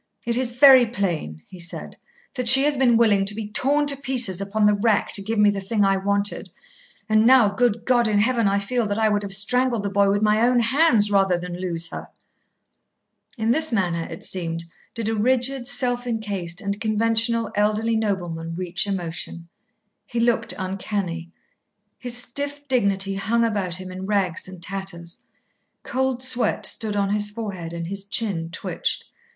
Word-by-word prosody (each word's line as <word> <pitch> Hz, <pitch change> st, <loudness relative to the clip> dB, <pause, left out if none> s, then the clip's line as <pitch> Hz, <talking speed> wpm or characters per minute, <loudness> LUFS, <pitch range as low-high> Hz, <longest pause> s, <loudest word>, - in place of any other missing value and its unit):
"It 235 Hz, -, 0 dB
is 245 Hz, -1 st, -1 dB
very 260 Hz, -1 st, +7 dB
plain," 170 Hz, -, -3 dB
he 185 Hz, -, -13 dB
said, 170 Hz, 0 st, -5 dB, 0.4 s
"that 250 Hz, -3 st, +2 dB
she 265 Hz, +2 st, +9 dB
has 295 Hz, 0 st, +2 dB
been 250 Hz, -3 st, +3 dB
willing 210 Hz, -4 st, +3 dB
to 205 Hz, +1 st, -3 dB
be 220 Hz, -1 st, -5 dB
torn 285 Hz, +6 st, +2 dB
to 285 Hz, -1 st, +2 dB
pieces 250 Hz, -9 st, +2 dB
upon 210 Hz, +2 st, 0 dB
the 210 Hz, -, +5 dB
rack 205 Hz, 0 st, +1 dB
to 200 Hz, -, 0 dB
give 220 Hz, +3 st, -3 dB
me 210 Hz, 0 st, +5 dB
the 200 Hz, -1 st, -4 dB
thing 205 Hz, +1 st, 0 dB
I 195 Hz, 0 st, +2 dB
wanted. 200 Hz, +1 st, -2 dB, 0.6 s
And 215 Hz, 0 st, +3 dB
now, 250 Hz, -5 st, +6 dB
good 225 Hz, +1 st, 0 dB
God 240 Hz, -2 st, +3 dB
in 210 Hz, -1 st, +1 dB
heaven, 230 Hz, +1 st, +2 dB
I 200 Hz, 0 st, +1 dB
feel 220 Hz, +3 st, -1 dB
that 205 Hz, 0 st, -2 dB
I 220 Hz, -1 st, +2 dB
would 205 Hz, -1 st, 0 dB
have 200 Hz, -1 st, -5 dB
strangled 235 Hz, +3 st, +1 dB
the 200 Hz, -, -3 dB
boy 200 Hz, 0 st, +3 dB
with 205 Hz, +1 st, +1 dB
my 215 Hz, +1 st, +3 dB
own 245 Hz, +1 st, +3 dB
hands 235 Hz, -3 st, +3 dB
rather 195 Hz, -3 st, +2 dB
than 180 Hz, 0 st, -7 dB
lose 170 Hz, -2 st, -2 dB
her." -, -, -8 dB, 1.3 s
In 225 Hz, 0 st, 0 dB
this 315 Hz, +3 st, +1 dB
manner, 175 Hz, -6 st, -1 dB
it 165 Hz, -, -9 dB
seemed, 165 Hz, -2 st, -4 dB, 0.3 s
did 230 Hz, -2 st, -3 dB
a 225 Hz, -, 0 dB
rigid, 250 Hz, +3 st, 0 dB
self 245 Hz, -3 st, -1 dB
encased, 200 Hz, -6 st, -4 dB
and 200 Hz, 0 st, -4 dB
conventional 225 Hz, +1 st, +1 dB
elderly 215 Hz, +2 st, +1 dB
nobleman 175 Hz, -6 st, -3 dB
reach 180 Hz, +2 st, -1 dB
emotion. 170 Hz, -2 st, -5 dB, 0.6 s
He 240 Hz, -, -3 dB
looked 230 Hz, -1 st, +1 dB
uncanny. 185 Hz, -3 st, -4 dB, 0.7 s
His 245 Hz, -1 st, -3 dB
stiff 285 Hz, +4 st, -3 dB
dignity 200 Hz, -6 st, +1 dB
hung 220 Hz, +4 st, 0 dB
about 200 Hz, -6 st, -1 dB
him 185 Hz, 0 st, -6 dB
in 185 Hz, +1 st, -7 dB
rags 195 Hz, -5 st, 0 dB
and 185 Hz, -2 st, -4 dB
tatters. 180 Hz, -3 st, -4 dB, 0.6 s
Cold 260 Hz, 0 st, -2 dB
sweat 250 Hz, -4 st, 0 dB
stood 215 Hz, -2 st, 0 dB
on 200 Hz, -1 st, 0 dB
his 210 Hz, 0 st, 0 dB
forehead 200 Hz, -6 st, -6 dB
and 170 Hz, 0 st, -5 dB
his 195 Hz, +3 st, -5 dB
chin 200 Hz, -6 st, -1 dB
twitched. 170 Hz, -, -3 dB
210 Hz, 180 wpm, -22 LUFS, 190-235 Hz, 1.3 s, she